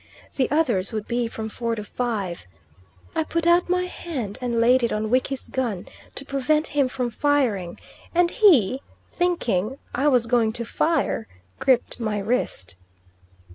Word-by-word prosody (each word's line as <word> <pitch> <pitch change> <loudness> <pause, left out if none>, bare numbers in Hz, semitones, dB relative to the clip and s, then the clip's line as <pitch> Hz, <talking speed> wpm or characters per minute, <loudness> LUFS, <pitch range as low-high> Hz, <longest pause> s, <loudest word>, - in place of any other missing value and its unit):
The 260 - +1
others 245 -11 +1
would 215 -2 -4
be 240 0 0
from 220 -1 -5
four 230 +1 -2
to 210 - -5
five. 205 - -3 0.7
I 320 - +1
put 335 +1 -2
out 345 +1 +4
my 360 0 +2
hand 285 - -5
and 240 -2 0
laid 250 +3 +5
it 235 - +1
on 215 +1 -1
Wiki's 260 +1 0
gun 230 -8 -2 0.3
to 275 - -4
prevent 290 +3 +1
him 280 -2 +1
from 250 -2 -2
firing, 230 -11 +1 0.4
and 350 0 +4
he, 275 - +5 0.3
thinking 265 - 0 0.2
I 275 +4 +1
was 250 -5 +4
going 230 -2 +2
to 235 0 -3
fire, 290 -4 0 0.3
gripped 255 -2 +2
my 215 -3 -1
wrist. 200 - -2
245 Hz, 155 wpm, -24 LUFS, 220-290 Hz, 0.7 s, laid